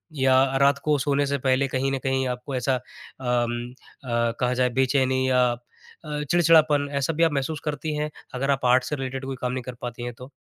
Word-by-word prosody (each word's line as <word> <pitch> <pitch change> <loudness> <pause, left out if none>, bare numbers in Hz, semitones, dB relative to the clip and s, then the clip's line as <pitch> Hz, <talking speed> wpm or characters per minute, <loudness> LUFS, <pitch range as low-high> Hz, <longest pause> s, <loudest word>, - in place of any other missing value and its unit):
या 130 -1 +4 0.2
रात 140 0 +4
को 150 -1 +2
सोने 145 +1 +1
से 140 0 0
पहले 130 +1 +3
कहीं 135 +1 -1
न 135 - 0
कहीं 130 -1 0
आपको 125 +2 -4
ऐसा 130 +1 +1
अम, 120 -1 -3 0.3
अ, 120 -2 0
कहा 125 -1 +1
जाए 125 0 +2
बेचैनी 130 0 +2
या 125 -1 +4 0.6
अ, 150 -1 -3
चिड़चिड़ापन 155 -4 +4
ऐसा 140 +4 0
भी 165 +2 +1
आप 165 - +4
महसूस 145 +2 -2
करती 150 +1 -3
हैं? 150 0 -2 0.2
अगर 135 +2 0
आप 135 -2 -1
आर्ट्स 125 +1 +3
से 150 - -1
रिलेटेड 135 -1 -5
कोई 135 0 -4
काम 125 -1 -1
नहीं 130 0 -3
कर 125 - -7
पाती 120 0 -6
हैं, 120 0 -4
तो? 125 +2 -12
130 Hz, 215 wpm, -24 LUFS, 125-145 Hz, 0.6 s, या